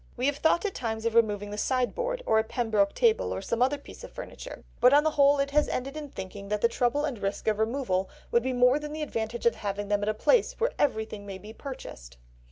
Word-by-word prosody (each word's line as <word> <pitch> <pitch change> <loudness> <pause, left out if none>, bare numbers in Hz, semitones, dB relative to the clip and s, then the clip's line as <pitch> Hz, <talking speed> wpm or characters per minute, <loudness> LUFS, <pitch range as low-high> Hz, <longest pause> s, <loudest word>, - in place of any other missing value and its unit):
we 250 - -1
have 285 0 +1
thought 320 +5 +2
at 400 - -1
times 220 -2 -4
of 230 - +1
removing 205 -3 +2
the 210 - -4
sideboard, 485 - -1
or 220 - +4
a - - +2
Pembroke 220 -3 0
table, 460 -2 +2
or - - -2
some 235 +1 -2
other 265 +3 +3
piece 285 - -13
of - - -9
furniture, - - -9 0.2
but 250 +2 +6
on 290 +1 +6
the 315 - +2
whole 285 -1 +5
it 280 0 0
has 300 +1 +3
ended 275 +3 -3
in 300 -2 -6
thinking 200 -2 -8
that 210 0 0
the - - +5
trouble 245 +5 0
and 265 -7 -4
risk 195 +2 -3
of 215 -1 +2
the 220 - +3
removal 220 -6 -1 0.2
would 235 - +4
be 260 +2 -1
more 250 +3 +4
than 300 0 -6
the 310 0 -3
advantage 230 -4 -4
of 235 - +5
having 205 0 -4
them 205 0 +1
at 205 - 0
a 215 - 0
place 475 - +3
where 475 +2 +1
everything 220 -6 -1
may 195 -1 -6
be 210 +3 -11
purchased." - - -9
240 Hz, 255 wpm, -28 LUFS, 210-285 Hz, 0.2 s, but